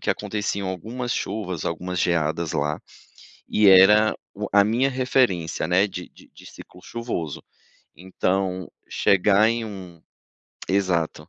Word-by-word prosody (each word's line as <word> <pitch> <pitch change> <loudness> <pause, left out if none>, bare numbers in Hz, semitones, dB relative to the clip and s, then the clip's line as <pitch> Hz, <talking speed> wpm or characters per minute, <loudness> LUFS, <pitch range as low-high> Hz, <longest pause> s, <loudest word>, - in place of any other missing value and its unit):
que - - -7
aconteciam 100 -2 -3
algumas 120 +7 -4
chuvas, 95 -7 -4
algumas 90 +2 -4
geadas 80 -1 0
lá, 75 +1 -2 0.7
e 105 -1 +3
era 105 +3 +6 0.2
o 105 +1 -4
a 100 0 +6
minha 120 +6 +1
referência, 125 -12 0
né, 95 +4 +3
de - - -8
de - - -18
ciclo 90 - -14
chuvoso. 115 - -5 0.6
Então, 95 0 -2 0.2
chegar 100 +3 +3
em 115 0 -1
um 95 -6 -10 0.7
exato. 90 -5 -1
95 Hz, 120 wpm, -23 LUFS, 90-110 Hz, 0.7 s, era